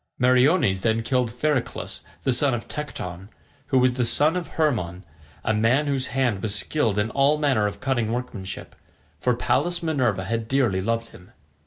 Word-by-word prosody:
Meriones 125 - +3
then 115 +1 +1
killed 125 -1 +1
Phereclus 130 +2 -2 0.2
the 130 - +2
son 135 0 +2
of 115 - -6
Tecton, 95 - -6 0.4
who 135 - +2
was 125 0 +4
the 125 0 0
son 150 +7 +3
of 180 -2 -3
Hermon, 100 - 0 0.4
a 110 - +1
man 115 +7 +2
whose 135 -2 -1
hand 120 -6 0
was 105 -1 -1
skilled 105 +2 0
in 105 +2 0
all 140 +2 +3
manner 130 -8 +2
of 100 - -6
cunning 120 -5 0
workmanship, 120 -6 -5 0.4
for 125 -1 +1
Pallas 175 +8 0
Minerva 130 - 0
had 115 +3 -3
dearly 120 -8 +1
loved 115 +3 -1
him. 90 - -16
125 Hz, 170 wpm, -24 LUFS, 110-140 Hz, 0.4 s, was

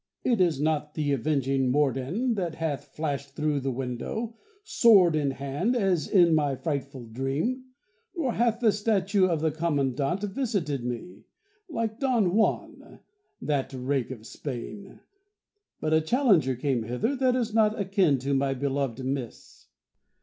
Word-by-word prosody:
It 235 -6 +2
is 165 -6 +2
not 150 0 -1
the 150 -2 0
avenging 135 -1 +1
Morden 145 - +1
that 175 -6 -3
hath 150 -3 -3
flashed 140 -1 -4
through 150 -2 0
the 135 0 -2
window, 135 - -4 0.3
sword 200 - +5
in 145 -2 +1
hand, 140 - -1
as 190 -9 +1
in 175 -4 +5
my 145 -3 +2
frightful 140 -4 -4
dream; 135 - -2 0.5
nor 275 -9 -1
hath 235 0 +1
the 225 -3 +5
statue 200 -2 +2
of 165 -4 -1
the 160 -1 +1
Commandant 145 +2 -1
visited 200 - -2
me, 125 +8 -6 0.4
like 230 -6 -3
Don 235 -10 +2
Juan, 220 +2 -1 0.4
that 140 -2 -1
Rake 130 -1 -1
of 115 -4 -8
Spain; 150 - -7 0.8
but 155 - -1
a 160 - +4
challenger 175 - +3
came 130 -1 0
hither 125 - -1
that 255 -1 +2
is 230 -4 -1
not 220 -1 +3
akin 190 -7 +2
to 140 +2 -1
my 135 0 +1
beloved 135 -2 -2
Miss. 130 -3 -6
155 Hz, 145 wpm, -27 LUFS, 135-205 Hz, 0.8 s, sword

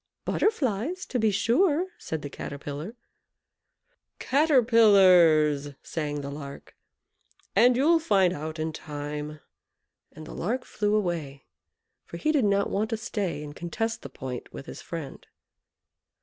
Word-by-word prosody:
"Butterflies, 315 - 0
to 250 - -2
be 220 -1 +3
sure," 290 - +2
said 160 -2 -5
the 145 - -5
Caterpillar. 145 - -6 1.2
"Caterpillars!" 190 - +4
sang 150 -3 -3
the 140 0 -6
Lark; 140 -1 -9 0.8
"and 240 +4 +5
you'll 325 +5 +4
find 195 - +3
it - - -5
out 155 +2 -6
in 160 0 -3
time;" 150 0 -6 0.7
and 155 +1 -11
the - - -9
Lark 245 +8 -2
flew 210 0 0
away, 165 -9 -2 0.6
for 170 - -9
he 305 - +1
did 285 -7 +2
not 200 0 +1
want 215 +2 0
to 225 - -1
stay 205 -8 -3
and 145 0 -9
contest 225 +7 -3
the - - -8
point 125 -2 -7
with 135 - -9
his - - -9
friend. 160 -5 -8
185 Hz, 135 wpm, -27 LUFS, 150-230 Hz, 1.2 s, and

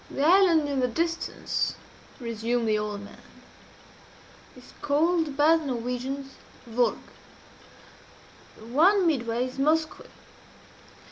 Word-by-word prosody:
"The 275 - -3
island 340 -3 +5
in 280 -2 -1
the 250 - +2
distance," 335 +7 -2 0.4
resumed 230 0 -2
the 215 -1 +2
old 210 -1 -4
man, 205 - -13 1.4
"is 250 - -16
called 310 0 +1
by 310 +3 +5
the 320 - -6
Norwegians 255 +2 -4 0.3
Vurrgh. 240 +1 +1 1.6
The 220 - -14
one 350 - +3
midway 240 -6 0
is 255 +1 -8
Moskoe. 310 +3 0
270 Hz, 110 wpm, -26 LUFS, 235-320 Hz, 1.6 s, island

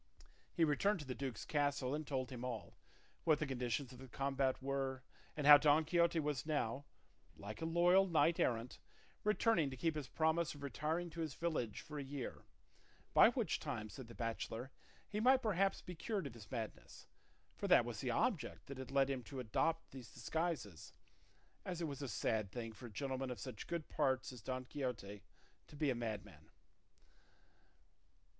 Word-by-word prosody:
He 170 - +2
returned 180 +7 +3
to - - -8
the 130 - -3
duke's 130 -5 -4
castle 145 -3 +1
and 150 0 -3
told 130 -3 -2
him 125 -1 -6
all, 120 -4 -5 0.5
what 155 -2 +5
the 150 - -1
conditions 125 0 -2
of 125 - -12
the 130 - -9
combat 135 +1 0
were, 135 -1 -2 0.3
and 150 - -1
how 145 0 +11
Don 150 +2 +5
Quixote 170 0 +3
was 145 -5 -1
now, 145 -3 -1 0.5
like 105 +6 -7
a - - -1
loyal 175 +3 +5
knight 170 0 +3
errant, 120 -5 0 0.4
returning 210 -7 +3
to 130 - -7
keep 160 +6 +1
his 150 -4 -4
promise 160 +2 +1
of 145 - -10
retiring 160 +5 -2
to 165 - -8
his 155 -4 -3
village 155 -10 -1
for 150 -2 -7
a - - -3
year, 135 -2 -6 0.7
by - - +9
which - - 0
time, 110 0 -4
said 125 +4 -9
the 115 - -11
bachelor, 115 +2 -3 0.4
he 210 - -3
might 260 +3 +5
perhaps 195 -3 +2
be 180 - -6
cured 195 +1 -2
of 135 - -5
his 110 -4 -12
madness; 115 -4 -6 0.5
for - - -3
that - - +6
was - - -4
the - - -1
object - - 0
that 140 -1 -7
had 130 - -6
led 135 -1 +3
him 135 -2 -2
to 135 +2 -7
adopt 165 +8 0
these 130 -4 -10
disguises, 160 - -3 0.7
as 180 -2 -4
it 170 - -1
was 140 -1 -5
a 140 - -2
sad 110 -5 0
thing 115 -1 -5
for 120 +3 -9
a - - -12
gentleman 135 +4 -2
of 125 -4 -5
such 105 +1 -6
good 170 -2 -3
parts 130 0 +1
as 125 - -10
Don 130 +3 -3
Quixote 120 -8 -4 0.5
to - - -13
be 145 -2 +1
a - - +2
madman. 105 -9 -5
140 Hz, 185 wpm, -38 LUFS, 125-160 Hz, 0.7 s, how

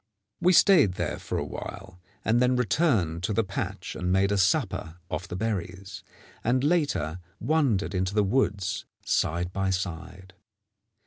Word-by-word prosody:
We 180 - +4
stayed 160 - +6
there - - -3
for - - -4
a - - -2
while, 95 -2 -8 0.3
and 115 +2 +3
then 125 0 +3
returned 110 - +1
to 100 +4 -1
the 115 - +2
patch 95 -1 -5
and 90 0 -2
made 95 +1 +3
a 100 - +2
supper 90 -3 +1 0.2
off 95 - -3
the 90 - -6
berries, 100 -1 -4 0.4
and 125 +3 +2
later 145 - +1 0.2
wandered 120 - +1
into 95 +2 -1
the 105 - +4
woods 100 -3 0 0.2
side 85 +3 0
by 95 0 0
side. 95 0 -4
95 Hz, 150 wpm, -27 LUFS, 90-115 Hz, 0.4 s, stayed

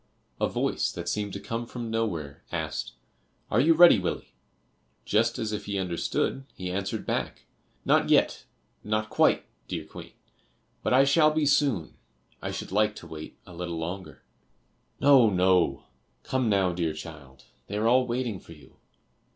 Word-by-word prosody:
A - - +1
voice - - 0
that 85 0 -6
seemed 105 +2 -2
to 100 - -4
come 115 +3 -4
from 120 -2 -6
nowhere 85 -11 -2
asked - - -3 0.6
"Are 110 - +3
you 160 +5 +5
ready, 170 - +8
Willie?" 90 -2 -4 0.7
Just 115 +2 +2
as 110 -1 -2
if 105 - -4
he 100 -1 -3
understood 95 +8 -1
he 90 -1 -5
answered 100 +1 -3
back - - -3 0.4
"Not - - +3
yet, - - +3 0.4
not 110 0 -1
quite, - - +3 0.2
dear - - -4
Queen, - - -11 0.7
but - - -1
I 130 +2 +6
shall 150 +3 +5
be 155 0 0
soon. 140 - +1 0.4
I - - -3
should - - -6
like 105 +1 +2
to - - -10
wait 80 -1 -9
a 90 - -13
little 85 -1 -5
longer." 90 +4 -6 0.8
"No, 135 -5 +6
no, 90 -7 +2 0.4
come 130 -3 0
now, 95 -3 +2
dear 85 -2 -1
child; 75 -5 -11 0.2
they 100 - -4
are 110 +2 +1
all 125 +1 +4
waiting 120 -4 -2
for 85 - -13
you." 75 - -18
105 Hz, 160 wpm, -27 LUFS, 85-120 Hz, 0.8 s, ready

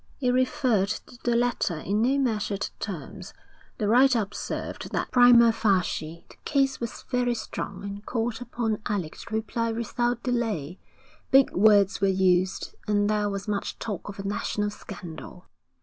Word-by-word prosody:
It 250 -3 +2
referred 255 -5 +2
to 240 +3 -6
the 240 -1 +1
letter 235 -8 +1
in 200 +7 -1
no 260 +4 +3
measured 215 -6 -1
terms: 190 +1 -7 0.4
the 210 - -1
writer 250 +3 +5
observed 205 -1 -5
that - - -2
prima 245 -2 +7
facie 180 -6 -1
the - - -17
case 275 -2 +1
was 235 -1 -6
very 245 -1 +1
strong 200 -3 -6
and 200 0 -6
called 230 0 -2
upon 230 -3 -2
Alec 185 -7 -2
to 220 - -6
reply 230 +1 -1
without 240 +1 -1
delay. 215 - -2 0.5
Big 270 0 +5
words 200 -1 +4
were 195 - +4
used, 185 -1 +1
and 205 0 +2
there 210 -1 +1
was 200 +1 -5
much 205 -1 -2
talk 205 -3 -5
of 200 - -8
a 195 - -5
national 205 +1 -1
scandal. 180 -3 -10
215 Hz, 155 wpm, -26 LUFS, 195-240 Hz, 0.5 s, prima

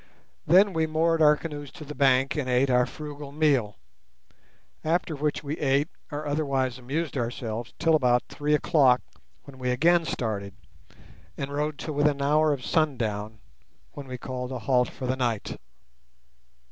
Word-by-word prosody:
Then 190 +5 +6
we 160 -1 +1
moored 160 +1 +1
our 150 -1 +6
canoes 145 -3 -7
to 160 -4 -10
the 150 - -7
bank, 135 -2 +3
and 140 -4 -2
ate 130 +2 +2
our 125 0 +3
frugal 145 -1 -8
meal; 140 - +1 1.1
after 165 +1 0
which 150 +1 -2
we 145 +2 -4
ate 140 +2 +2 0.2
or 150 +1 -4
otherwise 135 -4 -1
amused 145 +6 -3
ourselves 120 -1 -4
till 165 -1 +2
about 125 -5 +3
three 150 +1 0
o'clock, 140 -6 +4 0.4
when 135 -2 -13
we 125 -1 -2
again 165 +7 +3
started, 100 -8 -3 0.8
and 140 0 -4
rowed 150 0 -2
till 155 - -5
within 145 +1 +3
an 140 - -7
hour 150 +2 +3
of 135 -4 -3
sundown, 110 - -1 0.5
when 140 -2 -9
we 130 -1 -6
called 125 0 -5
a 130 - -3
halt 125 +1 +1
for 130 - -7
the 130 +1 0
night. 120 -5 -2
140 Hz, 160 wpm, -26 LUFS, 125-155 Hz, 1.1 s, Then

